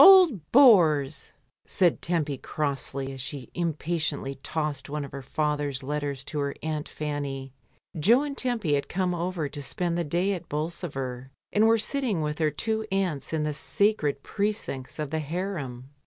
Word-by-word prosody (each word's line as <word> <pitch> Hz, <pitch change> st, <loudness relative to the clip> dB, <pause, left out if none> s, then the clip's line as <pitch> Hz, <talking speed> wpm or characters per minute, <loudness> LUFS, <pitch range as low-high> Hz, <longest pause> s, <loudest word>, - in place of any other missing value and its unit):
"Old 345 Hz, -, +7 dB
bores!" 160 Hz, -, +5 dB, 0.4 s
said 175 Hz, -3 st, +2 dB
Tempy 160 Hz, -4 st, 0 dB
crossly 140 Hz, -2 st, -2 dB
as 135 Hz, -, -7 dB
she 130 Hz, -1 st, -6 dB
im 170 Hz, -3 st, -1 dB
patiently 155 Hz, -4 st, -2 dB
tossed 150 Hz, -2 st, -2 dB
one 150 Hz, 0 st, -3 dB
of 140 Hz, -, -11 dB
her 140 Hz, -, -6 dB
father's 145 Hz, -1 st, -1 dB
letters 145 Hz, -1 st, -2 dB
to 150 Hz, -, -4 dB
her 140 Hz, -1 st, -1 dB
aunt 155 Hz, -1 st, -2 dB
Fanny. 140 Hz, -3 st, -4 dB, 0.5 s
Jo 235 Hz, -, +5 dB
and 285 Hz, -1 st, -4 dB
Tempy 235 Hz, -, 0 dB
had 140 Hz, -1 st, 0 dB
come 180 Hz, 0 st, 0 dB
over 175 Hz, -2 st, -2 dB
to 145 Hz, 0 st, -6 dB
spend 170 Hz, +4 st, 0 dB
the -, -, +1 dB
day 175 Hz, +6 st, +1 dB
at 180 Hz, -, -6 dB
Bolsover, 135 Hz, -5 st, -3 dB, 0.2 s
and 215 Hz, +2 st, +5 dB
were 225 Hz, 0 st, +5 dB
sitting 225 Hz, -, 0 dB
with 150 Hz, 0 st, -2 dB
their 155 Hz, -2 st, +2 dB
two 220 Hz, +8 st, -1 dB
aunts 180 Hz, -8 st, -1 dB
in 160 Hz, -1 st, 0 dB
the 150 Hz, 0 st, -1 dB
sacred 150 Hz, -3 st, +1 dB
precincts 205 Hz, -11 st, -2 dB
of 150 Hz, -2 st, -3 dB
the 160 Hz, -, 0 dB
harem. 145 Hz, -6 st, -4 dB
155 Hz, 170 wpm, -27 LUFS, 140-185 Hz, 0.5 s, Old